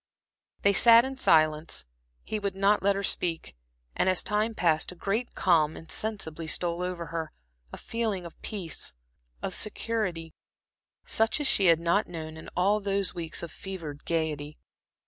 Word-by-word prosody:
They 200 Hz, -, +5 dB
sat 230 Hz, +4 st, +8 dB
in 270 Hz, 0 st, -4 dB
silence; 155 Hz, -, +2 dB, 0.4 s
he 215 Hz, -, -3 dB
would 200 Hz, -2 st, -3 dB
not 200 Hz, +2 st, +3 dB
let 200 Hz, +1 st, +3 dB
her 200 Hz, -, -2 dB
speak, 170 Hz, -, -1 dB, 0.4 s
and 185 Hz, -, +2 dB
as 185 Hz, -, +2 dB
time 215 Hz, +2 st, 0 dB
passed, 160 Hz, -4 st, +2 dB
a -, -, -10 dB
great 200 Hz, +7 st, -2 dB
calm 160 Hz, -4 st, +3 dB
insensibly 165 Hz, -3 st, -4 dB
stole 170 Hz, +1 st, -1 dB
over 180 Hz, -1 st, -3 dB
her, 160 Hz, -2 st, -3 dB, 0.4 s
a -, -, -7 dB
feeling 220 Hz, -6 st, -3 dB
of 170 Hz, -, -12 dB
peace, 185 Hz, -7 st, -3 dB, 0.5 s
of -, -, -2 dB
security, 190 Hz, -7 st, -2 dB, 0.7 s
such 225 Hz, +6 st, +2 dB
as 295 Hz, -, -2 dB
she 195 Hz, -7 st, +4 dB
had 165 Hz, -1 st, +6 dB
not 170 Hz, +5 st, +1 dB
known 160 Hz, -2 st, -7 dB
in 160 Hz, -, -10 dB
all 200 Hz, +4 st, +3 dB
those 200 Hz, -1 st, -1 dB
weeks 165 Hz, -2 st, -3 dB
of 170 Hz, -, -6 dB
fevered 165 Hz, -7 st, -7 dB
gaiety. 155 Hz, -3 st, -2 dB
180 Hz, 160 wpm, -28 LUFS, 165-205 Hz, 0.7 s, sat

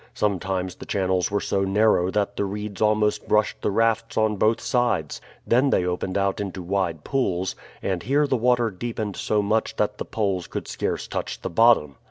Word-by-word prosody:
Sometimes 95 Hz, -2 st, -1 dB
the -, -, -12 dB
channels 95 Hz, -2 st, 0 dB
were 100 Hz, -, 0 dB
so 100 Hz, -, -1 dB
narrow 95 Hz, -2 st, +3 dB
that 100 Hz, +1 st, -1 dB
the -, -, -1 dB
reeds 100 Hz, 0 st, -5 dB
almost 105 Hz, -1 st, +2 dB
brushed 105 Hz, 0 st, +1 dB
the -, -, 0 dB
rafts 115 Hz, +2 st, +1 dB
on 110 Hz, -1 st, +2 dB
both 110 Hz, +3 st, +2 dB
sides; 120 Hz, -, 0 dB, 0.2 s
then 130 Hz, +4 st, +3 dB
they 90 Hz, -, +2 dB
opened 90 Hz, +2 st, -2 dB
out 100 Hz, 0 st, 0 dB
into 95 Hz, -2 st, -5 dB
wide 85 Hz, -4 st, -1 dB
pools, 95 Hz, -9 st, -1 dB, 0.3 s
and 95 Hz, -3 st, -1 dB
here 140 Hz, +5 st, +2 dB
the 140 Hz, -, +1 dB
water 120 Hz, -1 st, +2 dB
deepened 105 Hz, 0 st, -4 dB
so 105 Hz, -1 st, 0 dB
much 110 Hz, +2 st, 0 dB
that -, -, -1 dB
the -, -, -3 dB
poles 95 Hz, -5 st, -1 dB
could -, -, -5 dB
scarce -, -, -3 dB
touch -, -, -4 dB
the -, -, -3 dB
bottom. 85 Hz, -, +4 dB
105 Hz, 190 wpm, -24 LUFS, 95-110 Hz, 0.3 s, bottom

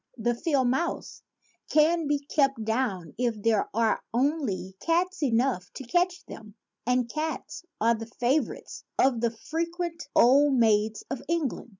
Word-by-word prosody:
The 240 Hz, +1 st, +1 dB
field 275 Hz, 0 st, +1 dB
mouse 295 Hz, +8 st, -2 dB, 0.5 s
can 315 Hz, +1 st, +3 dB
be 290 Hz, 0 st, +2 dB
kept 275 Hz, -6 st, +1 dB
down 220 Hz, -8 st, -1 dB
if 235 Hz, -3 st, 0 dB
there 220 Hz, 0 st, +1 dB
are 225 Hz, 0 st, +1 dB
only 245 Hz, -, -1 dB
cats 355 Hz, -, 0 dB
enough 240 Hz, -7 st, +1 dB
to -, -, -6 dB
catch 355 Hz, +7 st, 0 dB
them; 215 Hz, -2 st, -11 dB, 0.3 s
and 250 Hz, -1 st, +2 dB
cats 310 Hz, +6 st, -4 dB, 0.2 s
are 230 Hz, +2 st, +4 dB
the 225 Hz, 0 st, -6 dB
favor 245 Hz, +4 st, 0 dB
ites -, -, -11 dB
of 250 Hz, -4 st, +3 dB
the 235 Hz, -, +2 dB
frequent 335 Hz, +7 st, -4 dB
old 275 Hz, +3 st, +5 dB
maids 220 Hz, -2 st, +2 dB
of 270 Hz, -, -3 dB
England. 320 Hz, -7 st, -2 dB
255 Hz, 145 wpm, -27 LUFS, 225-310 Hz, 0.5 s, old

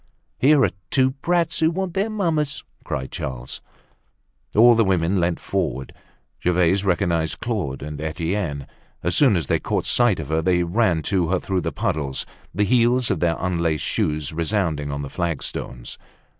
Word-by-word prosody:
"Here 140 Hz, +1 st, +5 dB
are -, -, -1 dB, 0.2 s
two 130 Hz, -1 st, +3 dB
brats 165 Hz, +5 st, 0 dB
who 160 Hz, 0 st, +4 dB
want 185 Hz, +1 st, -3 dB
their 195 Hz, +4 st, 0 dB
mamma!" 165 Hz, -8 st, 0 dB, 0.4 s
cried 65 Hz, -1 st, -4 dB
Charles. 65 Hz, -1 st, -5 dB, 0.9 s
All 120 Hz, +3 st, +8 dB
the 115 Hz, 0 st, +4 dB
women 95 Hz, -1 st, +1 dB
leant 85 Hz, 0 st, 0 dB
forward. 65 Hz, 0 st, -2 dB, 0.5 s
Gervaise 90 Hz, +2 st, +3 dB
recognized 85 Hz, -4 st, 0 dB
Claude 100 Hz, -, -3 dB
and 75 Hz, 0 st, -6 dB
Etienne. 80 Hz, -2 st, -2 dB, 0.4 s
As 90 Hz, 0 st, 0 dB
soon 130 Hz, -5 st, +5 dB
as 85 Hz, -4 st, 0 dB
they -, -, +1 dB
caught -, -, -2 dB
sight 120 Hz, -7 st, +3 dB
of 75 Hz, -, -6 dB
her, 80 Hz, +1 st, +1 dB
they 90 Hz, +1 st, +2 dB
ran 85 Hz, -3 st, +1 dB
to 90 Hz, -2 st, +1 dB
her 90 Hz, +2 st, +1 dB
through 95 Hz, -2 st, -1 dB
the -, -, -2 dB
puddles, 70 Hz, -3 st, -2 dB, 0.3 s
the 100 Hz, +4 st, 0 dB
heels 120 Hz, +2 st, +3 dB
of -, -, 0 dB
their 85 Hz, -1 st, +2 dB
unlaced 85 Hz, -4 st, -1 dB
shoes 75 Hz, +1 st, -1 dB
resounding 80 Hz, -4 st, -1 dB
on 70 Hz, 0 st, -3 dB
the -, -, -4 dB
flagstones. 80 Hz, -7 st, -4 dB
90 Hz, 165 wpm, -22 LUFS, 80-120 Hz, 0.9 s, All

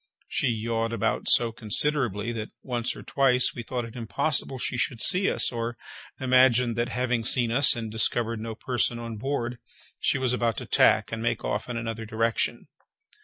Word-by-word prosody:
She -, -, 0 dB
yawed 115 Hz, 0 st, -1 dB
about 115 Hz, 0 st, -1 dB
so 120 Hz, -1 st, +5 dB
considerably, 115 Hz, -1 st, -1 dB
that 110 Hz, -2 st, -5 dB
once 120 Hz, -2 st, -2 dB
or -, -, -10 dB
twice 125 Hz, -2 st, +2 dB
we 120 Hz, -, -6 dB
thought 120 Hz, 0 st, -4 dB
it 115 Hz, -, -11 dB
impossible 125 Hz, +4 st, -1 dB
she 125 Hz, 0 st, -2 dB
could 125 Hz, -3 st, -1 dB
see 185 Hz, -, +4 dB
us, -, -, +1 dB
or 120 Hz, 0 st, -4 dB, 0.4 s
imagined 125 Hz, -2 st, +4 dB
that, 120 Hz, +2 st, -1 dB
having 125 Hz, -2 st, -1 dB
seen 120 Hz, 0 st, +2 dB
us, 135 Hz, +4 st, +5 dB
and 115 Hz, -2 st, -5 dB
discovered 115 Hz, +1 st, 0 dB
no 110 Hz, 0 st, -5 dB
person 120 Hz, -1 st, -1 dB
on 115 Hz, -1 st, -6 dB
board, 120 Hz, -1 st, -3 dB, 0.4 s
she -, -, +1 dB
was 130 Hz, -2 st, 0 dB
about 115 Hz, -3 st, 0 dB
to -, -, -5 dB
tack 110 Hz, 0 st, +3 dB
and 115 Hz, 0 st, -4 dB
make 120 Hz, -, -1 dB
off 105 Hz, +4 st, -2 dB
in 120 Hz, -, -3 dB
another 115 Hz, -1 st, -5 dB
direction. 115 Hz, +1 st, -1 dB
120 Hz, 180 wpm, -26 LUFS, 115-125 Hz, 0.4 s, so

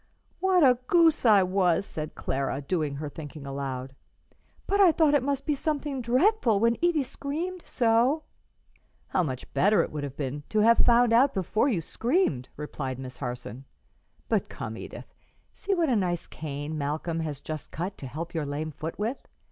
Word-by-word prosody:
"What 370 Hz, -3 st, +4 dB
a 250 Hz, -3 st, +5 dB
goose 330 Hz, -7 st, +4 dB
I 205 Hz, -3 st, +7 dB
was!" 185 Hz, -1 st, +2 dB
said 155 Hz, -4 st, -6 dB
Clara, 135 Hz, 0 st, -2 dB
doing 150 Hz, -1 st, -2 dB
her 150 Hz, +2 st, -4 dB
thinking 145 Hz, 0 st, -9 dB
aloud. 135 Hz, -1 st, -4 dB, 0.7 s
"But 400 Hz, +1 st, +2 dB
I 370 Hz, -4 st, +8 dB
thought 315 Hz, -2 st, +3 dB
it 290 Hz, -, +4 dB
must 275 Hz, +1 st, -2 dB
be 300 Hz, -, +1 dB
something 290 Hz, -2 st, -2 dB
dreadful, 250 Hz, -, +3 dB
when 230 Hz, +2 st, +3 dB
Edie 340 Hz, -4 st, +3 dB
screamed 325 Hz, +8 st, -4 dB
so." 245 Hz, +6 st, +2 dB, 0.9 s
"How -, -, +2 dB
much 130 Hz, -7 st, -5 dB
better 205 Hz, +3 st, +4 dB
it -, -, -6 dB
would 150 Hz, -1 st, -4 dB
have 140 Hz, -2 st, -6 dB
been 145 Hz, 0 st, -3 dB
to 215 Hz, -, +2 dB
have 230 Hz, +2 st, +5 dB
found 240 Hz, -1 st, +5 dB
out 270 Hz, +4 st, +4 dB
before 215 Hz, -, +1 dB
you 195 Hz, -10 st, 0 dB
screamed!" 230 Hz, -, 0 dB
replied 140 Hz, -3 st, -4 dB
Miss 130 Hz, -1 st, -8 dB
Harson. 125 Hz, -1 st, -6 dB, 0.6 s
"But -, -, 0 dB
come, -, -, -6 dB
Edith; -, -, -9 dB, 0.4 s
see 395 Hz, -1 st, -1 dB
what 340 Hz, -3 st, +2 dB
a 255 Hz, -, +2 dB
nice 180 Hz, -5 st, 0 dB
cane 150 Hz, 0 st, -5 dB
Malcolm 155 Hz, +3 st, -2 dB
has 150 Hz, -4 st, -3 dB
just 155 Hz, +1 st, -6 dB
cut 180 Hz, +5 st, -4 dB
to 135 Hz, -, -6 dB
help 165 Hz, +6 st, -6 dB
your 155 Hz, -4 st, -2 dB
lame 150 Hz, +2 st, -3 dB
foot 155 Hz, +3 st, -6 dB
with. 225 Hz, +6 st, -3 dB
190 Hz, 180 wpm, -27 LUFS, -, 0.9 s, I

